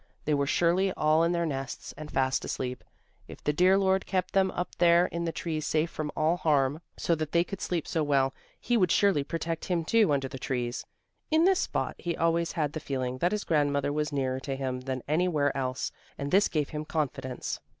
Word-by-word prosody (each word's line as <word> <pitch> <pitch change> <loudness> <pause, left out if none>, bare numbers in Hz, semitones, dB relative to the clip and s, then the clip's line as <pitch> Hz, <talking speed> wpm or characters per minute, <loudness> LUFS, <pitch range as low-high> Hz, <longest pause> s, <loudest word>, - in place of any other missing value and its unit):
They 150 - +1
were 140 -1 +1
surely 175 +5 +2
all 155 +1 +3
in 170 - +2
their 170 -1 0
nests 135 -3 -5
and 155 0 -8
fast 130 0 +1
asleep. 125 -1 -4 0.4
If - - -12
the 150 - +1
dear 185 +5 +5
Lord 190 -1 +2
kept 185 -1 -1
them 190 -1 +3
up 180 -1 -4
there 170 0 +6
in 170 -1 -3
the 165 - -1
trees 160 -2 -3
safe 155 +1 +1
from 150 -1 -4
all 160 +3 +2
harm, 145 -2 +1 0.2
so 170 - +1
that 155 -2 -2
they 170 0 +4
could 195 +1 -7
sleep 170 -3 -2
so 160 - 0
well, 135 -3 +2 0.3
He 240 - +1
would 185 -5 +3
surely 195 -8 +3
protect 165 +2 -3
him 170 -3 -1
too 220 -3 +4
under 135 -2 +1
the 135 0 -8
trees. 125 -2 -3 0.4
In 315 +2 +4
this 380 0 +4
spot - - -1
he 170 -1 -3
always 165 0 +1
had 150 -2 -1
the 155 - -3
feeling 130 -3 -3
that 175 - +2
his 210 -1 -1
grandmother 145 -2 +1
was 150 0 -1
nearer 130 -2 -1
to 135 0 -4
him 130 -1 -3
than 130 -1 -4
anywhere 155 -3 +1
else, 130 -1 -2 0.3
and 140 0 -4
this 200 +2 +5
gave 150 -4 -1
him 150 0 -4
confidence. 135 -5 -3
155 Hz, 215 wpm, -28 LUFS, 140-175 Hz, 0.4 s, there